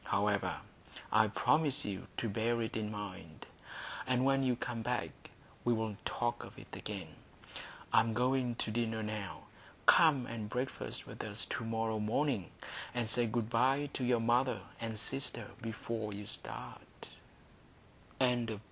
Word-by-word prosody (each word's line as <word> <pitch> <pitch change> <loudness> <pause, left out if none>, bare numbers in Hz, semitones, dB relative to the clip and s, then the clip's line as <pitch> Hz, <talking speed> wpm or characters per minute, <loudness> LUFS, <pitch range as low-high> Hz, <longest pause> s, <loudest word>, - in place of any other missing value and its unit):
However, 100 0 +2 0.6
I 110 0 +6
promise 145 +6 +3
you 100 -2 -4
to 115 - 0
bear 115 +3 +1
it 115 - -3
in 110 -1 -1
mind, 95 -6 -6 0.6
and 130 0 +3
when 135 0 +4
you 130 -2 +3
come 120 -1 -3
back - - 0 0.5
we'll 110 -3 +1
talk 120 0 0
of - - -11
it - - -10
again. 100 -5 -4 0.9
I - - +9
am 110 0 +1
going 125 0 +2
to 110 - -1
dinner 110 -1 0
now. 105 -2 -4 0.4
Come 145 -6 +7
and 110 -3 -4
breakfast 125 +3 -3
with - - -6
us - - -2
to - - -1
morrow 110 -1 0
morning, 110 - +1 0.5
and 120 -2 +1
say 120 +1 +2
good 115 0 -1
bye 135 +5 +3
to 130 - -2
your 120 -1 +4
mother 120 -1 +3 0.2
and 115 -1 -3
sister 120 0 -3 0.2
before 110 -1 -3
you 100 +1 -6
start." - - -7 1.1
Chapter 120 -3 +2
VI. - - -11
115 Hz, 150 wpm, -35 LUFS, 110-125 Hz, 1.1 s, I